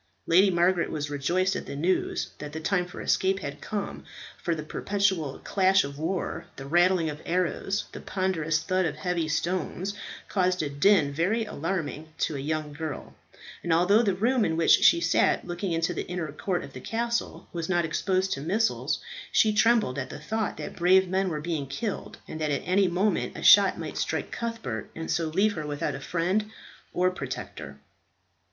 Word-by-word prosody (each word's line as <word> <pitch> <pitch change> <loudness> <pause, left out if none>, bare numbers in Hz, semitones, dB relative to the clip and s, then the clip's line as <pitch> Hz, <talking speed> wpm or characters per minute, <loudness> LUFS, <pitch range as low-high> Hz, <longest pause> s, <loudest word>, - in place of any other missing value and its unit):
Lady 185 +4 +5
Margaret 175 0 +2
was 145 -2 -3
rejoiced 180 +7 +1
at - - -5
the - - -5
news 175 +6 0
that 150 0 -7
the 160 - -4
time 180 +2 0
for 180 - -8
escape 190 0 +2
had 145 -1 -6
come, 210 -2 -4 0.4
for 170 - 0
the 155 - -5
perpetual 190 -4 -1
clash 190 0 +3
of 140 +1 -7
war, 175 +4 -3
the 135 - -8
rattling 175 +2 +3
of 150 0 -5
arrows, 185 +3 -1
the - - -8
ponderous 175 -5 0
thud 185 0 +1
of 150 - -4
heavy 170 +1 -1
stones, 180 +4 -2 0.3
caused 185 -3 +1
a 145 - -2
din 145 0 +4
very 200 +9 +1
alarming 165 -4 -3
to 155 - -1
a - - -3
young 150 +1 -3
girl; 155 -1 -6 0.5
and 170 - -2
although 180 +7 +5
the 200 -5 +1
room 235 +5 +2
in 160 -3 0
which 165 - +3
she 170 - +6
sat, 165 0 +2
looking 175 +1 -3
into 165 +1 0
the - - -4
inner 175 -4 -3
court 180 +4 -2
of 140 - -10
the 130 - -8
castle, 235 - -2
was 170 -1 -3
not 175 -2 +2
exposed 185 +4 0
to 140 - -5
missiles, 210 +9 0 0.3
she 215 -1 +4
trembled 215 - +3
at 130 - -4
the - - -7
thought 215 +9 -2
that - - -6
brave 185 +2 +5
men 190 +1 0
were 155 -3 -3
being 155 -4 -2
killed, 205 - -4
and 155 - -7
that 155 - 0
at 140 - -1
any 190 +1 +3
moment 185 +4 0
a - - -6
shot - - +7
might - - -5
strike - - -2
Cuthbert, 230 - -4
and 165 0 -4
so 165 0 0
leave 195 +7 +2
her 155 -4 -5
without 145 -1 -2
a - - -5
friend 185 +8 0 0.4
or 180 +1 +2
protector. 80 - -6
175 Hz, 190 wpm, -27 LUFS, 155-190 Hz, 0.5 s, shot